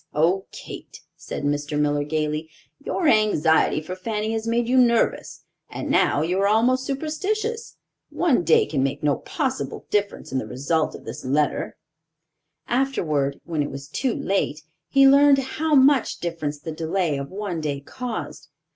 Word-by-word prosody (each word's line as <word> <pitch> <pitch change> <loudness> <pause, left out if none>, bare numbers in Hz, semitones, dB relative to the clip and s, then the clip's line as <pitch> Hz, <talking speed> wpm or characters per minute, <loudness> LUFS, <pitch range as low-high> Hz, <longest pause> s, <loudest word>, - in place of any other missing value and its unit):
"Oh, 175 +6 +2
Kate," - - -10
said - - -7
Mr. 145 +1 -1
Miller, 145 0 +1
gayly, 155 +1 -2 0.3
"your 335 - -1
anxiety 170 - +3
for 180 +4 -6
Fanny 215 +3 -3
has 225 0 -3
made 230 0 +1
you 255 - +1
nervous, 240 -2 +2 0.3
and - - -4
now 145 - +3
you 180 +4 0
are 200 - +3
almost 250 +5 +2
superstitious. 415 - -3 0.3
One 305 - +1
day 165 -1 +4
can 140 -4 -1
make 135 +2 -2
no 145 -2 +2
possible 265 -4 -3
difference 205 -1 -1
in 130 - 0
the - - -5
result 145 +5 -1
of - - -12
this 115 - -7
letter." 140 +2 0 0.9
Afterward, 155 - 0
when 160 -3 -2
it 145 - -2
was 135 0 -8
too 250 - -1
late, 160 -6 -1 0.3
he 275 0 +6
learned 280 +1 +6
how 300 +4 0
much 270 -1 +4
difference 165 -4 -3
the 160 - -6
delay 160 0 -1
of 140 - -6
one 190 -4 -4
day 145 -2 -2
caused. 240 - -6
185 Hz, 160 wpm, -23 LUFS, -, 0.9 s, he